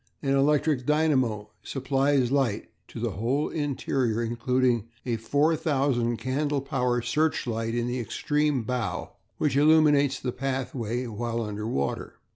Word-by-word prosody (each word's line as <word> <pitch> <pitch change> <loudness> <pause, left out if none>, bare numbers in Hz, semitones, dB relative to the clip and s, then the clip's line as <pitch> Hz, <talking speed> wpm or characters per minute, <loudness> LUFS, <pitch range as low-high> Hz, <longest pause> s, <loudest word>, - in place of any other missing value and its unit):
An 135 -1 +1
electric 140 -1 +2
dynamo 130 -9 +1
supplies 135 -1 +1
light 135 -7 0 0.2
to - - -9
the - - -1
whole 125 +8 -1
interior, 130 -6 -1
including 120 0 +1 0.2
a 120 -2 0
4000 140 -2 +1
candle 145 +3 -1
power 125 -3 -1
searchlight 115 -7 0
in 120 0 0
the 125 +1 -2
extreme 145 +3 0
bow 125 -2 -3 0.3
which 150 -4 0
illuminates 145 -2 +4
the 125 - -2
pathway 130 -2 -3
while 115 +1 -3
under 105 0 -4
water. 70 -11 -2
130 Hz, 125 wpm, -27 LUFS, 120-145 Hz, 0.3 s, illuminates